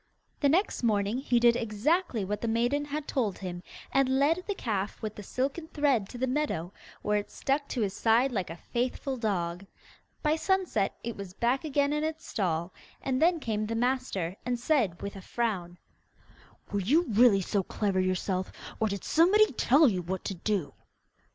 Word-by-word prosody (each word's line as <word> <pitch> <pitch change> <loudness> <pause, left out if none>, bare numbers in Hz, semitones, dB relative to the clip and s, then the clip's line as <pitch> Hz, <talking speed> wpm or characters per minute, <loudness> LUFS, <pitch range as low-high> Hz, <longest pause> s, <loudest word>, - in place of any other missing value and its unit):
The 285 - +3
next 360 +8 +1
morning 215 0 +1
he 245 -3 +2
did 235 0 +5
exactly 235 - 0
what 210 +2 -3
the 235 - -1
maiden 240 +6 +1
had 295 +1 -4
told 225 -8 -1
him, 180 -2 -6 0.3
and 265 -1 +3
led 320 +6 +2
the 405 - -1
calf 205 - -2
with 215 -1 -3
the 210 - -9
silken 270 - -3
thread 280 - +1
to 245 - -8
the 260 - 0
meadow, 250 - -1 0.3
where 210 0 +2
it 205 - -7
stuck 280 +1 -1
to 245 - -2
his 200 -3 0
side 230 +6 +3
like 195 -7 -2
a 165 - -6
faithful 255 - -2
dog. 185 -6 -2 0.6
By 305 +1 +2
sunset, 365 - 0
it 235 0 -4
was 195 -2 -8
back 245 +5 +1
again 285 -1 +1
in 300 0 0
its 315 0 -3
stall, 170 -3 -1 0.3
and 260 0 0
then 335 +1 +4
came 215 -5 -2
the 230 - -2
master 230 -7 -1
and 245 0 -1
said, 235 - +1
with 200 - -5
a 195 - -8
frown, 185 -6 -2 0.9
'Were 205 - 0
you 290 - +3
really 220 -3 +5
so 195 +2 0
clever 195 0 -1
yourself, 185 0 -1 0.3
or 220 - +2
did 200 -2 -4
somebody 380 +7 +5
tell 280 +4 +5
you 190 -6 +1
what 185 +2 -4
to 200 - -2
do? 190 -3 -2
235 Hz, 185 wpm, -29 LUFS, 195-280 Hz, 0.9 s, did